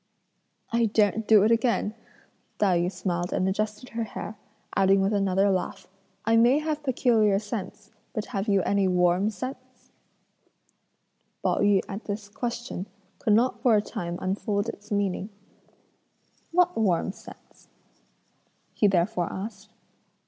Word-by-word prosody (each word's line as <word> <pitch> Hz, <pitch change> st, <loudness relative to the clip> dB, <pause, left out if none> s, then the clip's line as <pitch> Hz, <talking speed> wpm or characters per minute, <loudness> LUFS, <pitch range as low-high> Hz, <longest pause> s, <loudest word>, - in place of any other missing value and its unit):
"I 230 Hz, 0 st, +2 dB
daren't 215 Hz, 0 st, +1 dB
do 215 Hz, -3 st, +7 dB
it 220 Hz, -, +3 dB
again," 230 Hz, -2 st, +1 dB, 0.6 s
Tai 185 Hz, -4 st, +3 dB
yü 175 Hz, +2 st, 0 dB
smiled 175 Hz, -1 st, -2 dB
and 185 Hz, -, 0 dB
adjusted 210 Hz, +4 st, -2 dB
her 230 Hz, 0 st, -3 dB
hair; 215 Hz, 0 st, -7 dB, 0.4 s
adding 195 Hz, 0 st, +4 dB
with 195 Hz, +2 st, +1 dB
another 195 Hz, 0 st, +2 dB
laugh: 185 Hz, -1 st, -3 dB, 0.4 s
"I 225 Hz, +1 st, +4 dB
may 240 Hz, +4 st, +5 dB
have 305 Hz, 0 st, -2 dB
peculiar 230 Hz, -7 st, +3 dB
scents, 210 Hz, 0 st, -6 dB, 0.2 s
but 215 Hz, -, -3 dB
have 195 Hz, +1 st, -2 dB
you 200 Hz, -3 st, +3 dB
any 200 Hz, -1 st, +2 dB
'warm' 180 Hz, +2 st, +3 dB
scents?" 255 Hz, +4 st, -8 dB, 1.5 s
Pao -, -, +1 dB
yü 205 Hz, -2 st, +4 dB
at 200 Hz, +1 st, -7 dB
this 205 Hz, 0 st, -5 dB
question, 235 Hz, -3 st, -4 dB, 0.3 s
could 215 Hz, -, +2 dB
not 240 Hz, +4 st, +2 dB
for 240 Hz, -4 st, +4 dB
a 210 Hz, -, +4 dB
time 175 Hz, -3 st, -5 dB
unfold 200 Hz, +3 st, -1 dB
its 210 Hz, -1 st, -9 dB
meaning: 200 Hz, -1 st, -1 dB, 1.2 s
"What 360 Hz, +1 st, +3 dB
'warm' 190 Hz, -4 st, +1 dB
scent?" -, -, -16 dB, 1.1 s
he 210 Hz, -, +3 dB
therefore 180 Hz, -1 st, +1 dB
asked. 205 Hz, +1 st, -7 dB
205 Hz, 135 wpm, -26 LUFS, 195-225 Hz, 1.5 s, do